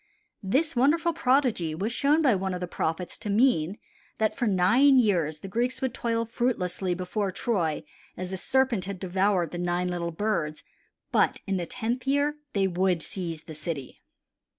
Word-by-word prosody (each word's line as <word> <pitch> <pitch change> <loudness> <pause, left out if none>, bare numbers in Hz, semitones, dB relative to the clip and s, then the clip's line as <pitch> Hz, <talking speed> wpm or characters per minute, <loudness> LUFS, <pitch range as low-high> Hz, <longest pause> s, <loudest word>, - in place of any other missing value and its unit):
This 270 +11 0
wonderful 330 +7 +3
prodigy 250 - +1
was 205 +7 -2
shown 290 +6 +2
by 265 -5 +5
one 190 -1 -1
of - - -4
the 180 - -2
prophets 170 0 -3
to 210 - -5
mean 205 -5 +2 0.4
that 220 -1 +1
for 245 -3 0
nine 235 +9 +5
years 175 -10 +2
the - - -7
Greeks 240 +6 -1
would 260 -3 -1
toil 230 -2 -1
fruitlessly 195 -6 -1
before 190 +2 -2
Troy 175 -7 -1 0.3
as 185 0 -5
the 190 - -3
serpent 255 -2 +1
had 195 -1 -5
devoured 190 -2 +1
the 175 - -5
nine 175 +1 0
little 175 -1 -2
birds; 165 -4 -2 0.5
but - - +2
in 195 -1 0
the 175 -2 -3
tenth 250 +4 -3
year 285 +2 +1 0.2
they 195 -1 +2
would 180 -2 +1
seize 170 -5 -4
the 160 - -9
city. 155 -3 -6
195 Hz, 175 wpm, -27 LUFS, 175-245 Hz, 0.5 s, by